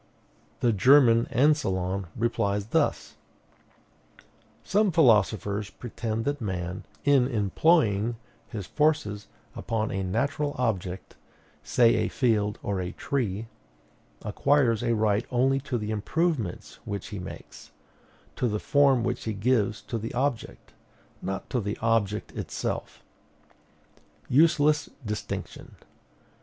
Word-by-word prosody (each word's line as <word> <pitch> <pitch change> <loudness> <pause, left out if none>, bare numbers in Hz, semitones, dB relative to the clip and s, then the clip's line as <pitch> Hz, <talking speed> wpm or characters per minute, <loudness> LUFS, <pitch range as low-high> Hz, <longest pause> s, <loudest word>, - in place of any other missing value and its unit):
The 120 -2 +3
German 115 +2 +5
Ancillon 100 - +1
replies 105 -3 0
thus: - - 0 1.5
"Some 205 0 +2
philosophers 105 - +3
pretend 115 +1 -4
that 145 -1 -2
man, 90 -3 -4 0.2
in 140 -3 +4
employing 115 - +2 0.3
his 105 -6 -6
forces 150 -9 0 0.3
upon 110 -1 -2
a 95 - -2
natural 145 - -1
object, 95 -7 -3 0.4
say 115 +10 +3
a - - +1
field 105 -5 +1
or 100 -2 -1
a 90 0 -4
tree, 115 -6 -2 0.8
acquires 115 +1 +2
a 120 -1 +1
right 105 0 +1
only 135 +2 +2
to 135 -2 -3
the 105 -1 -4
improvements 120 - -2
which 100 -1 -5
he 100 -2 -6
makes, 90 - -10 0.7
to 125 - +1
the 105 -2 -1
form 140 -3 +3
which 120 0 -2
he 110 - -1
gives 110 0 0
to 115 - -4
the 115 +3 -6
object, 130 -2 -3 0.5
not 95 0 -4
to 125 - +1
the 105 0 -3
object 110 -2 0
itself. - - -5 1.2
Useless 150 +1 +3 0.2
distinction! 105 0 -6
115 Hz, 115 wpm, -27 LUFS, 100-135 Hz, 1.5 s, German